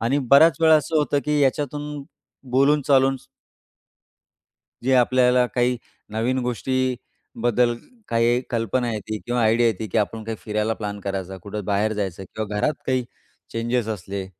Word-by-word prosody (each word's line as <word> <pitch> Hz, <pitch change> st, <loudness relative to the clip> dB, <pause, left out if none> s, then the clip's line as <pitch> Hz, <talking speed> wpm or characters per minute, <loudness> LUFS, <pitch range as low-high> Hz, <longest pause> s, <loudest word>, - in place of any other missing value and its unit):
आणि 120 Hz, +6 st, +1 dB
बऱ्याच 145 Hz, +2 st, +7 dB
वेळा 160 Hz, -1 st, +6 dB
असं 155 Hz, +2 st, -1 dB
होतं 145 Hz, -1 st, +1 dB
की 150 Hz, 0 st, +1 dB
याच्यातून 145 Hz, +1 st, -1 dB, 0.5 s
बोलून-चालून 135 Hz, 0 st, +3 dB, 1.7 s
जे 130 Hz, +2 st, +2 dB
आपल्याला 125 Hz, 0 st, +4 dB
काही 125 Hz, 0 st, +2 dB, 0.3 s
नवीन 115 Hz, +4 st, 0 dB
गोष्टीबद्दल 125 Hz, -1 st, -1 dB, 0.3 s
काही 120 Hz, +1 st, +2 dB
कल्पना 120 Hz, +1 st, 0 dB
येते 110 Hz, 0 st, -4 dB
किंवा 120 Hz, 0 st, 0 dB
आयडिया 115 Hz, +2 st, +3 dB
येते, 110 Hz, -1 st, -1 dB
की 110 Hz, -, -1 dB
आपण 110 Hz, +1 st, -2 dB
काही 110 Hz, 0 st, -4 dB
फिरायला 105 Hz, +1 st, -1 dB
प्लॅन 105 Hz, -2 st, -5 dB
करायचा, 95 Hz, -1 st, -4 dB
कुठं 105 Hz, +1 st, -6 dB
बाहेर 105 Hz, +2 st, +1 dB
जायचं 95 Hz, -3 st, -4 dB
किंवा 105 Hz, -1 st, -4 dB
घरात 150 Hz, +8 st, +1 dB
काही 130 Hz, -1 st, +1 dB, 0.5 s
चेंजेस 115 Hz, 0 st, -1 dB
असले, 100 Hz, -2 st, -4 dB
120 Hz, 140 wpm, -23 LUFS, 110-130 Hz, 1.7 s, बऱ्याच